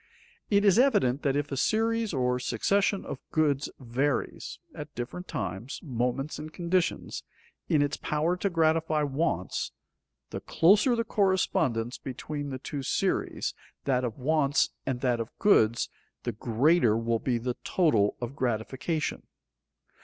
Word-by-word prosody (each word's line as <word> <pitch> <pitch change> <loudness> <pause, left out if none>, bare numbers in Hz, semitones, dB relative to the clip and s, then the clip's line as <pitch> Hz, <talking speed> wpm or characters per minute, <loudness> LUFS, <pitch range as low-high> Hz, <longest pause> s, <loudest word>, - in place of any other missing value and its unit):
_ - - -34 0.5
It 205 0 +3
is 200 +2 +6
evident 145 - +3
that 140 -1 +1
if 145 0 -1
a - - -1
series 225 - +1
or 125 -4 +1
succession 195 - +1
of - - -5
goods 150 -3 +1
varies, 130 +3 -2 0.2
at 150 0 -9
different 135 +9 -5
times, 95 +6 -4
moments, 130 +1 -2
and 155 +1 -7
conditions, 175 +1 -1 0.5
in 150 -2 +4
its 145 +1 -1
power 155 +4 0
to 200 - 0
gratify 160 -2 +2
wants, 140 - -1 0.6
the - - -5
closer 210 +9 +4
the 230 - 0
correspondence 185 - +1
between 145 +2 -5
the 130 - -4
two 140 +2 -5
series, 130 - -1 0.3
that 130 -2 +1
of 115 -3 -3
wants 145 +1 +2 0.2
and 125 -2 -1
that 125 -3 +1
of 115 0 -6
goods, 115 - +4 0.4
the 120 - -1
greater 120 +3 +3
will 115 0 0
be 125 0 0
the 120 +1 -3
total 150 - +2
of 120 +2 -5
gratification. 130 +6 -2
145 Hz, 145 wpm, -28 LUFS, 125-170 Hz, 0.6 s, is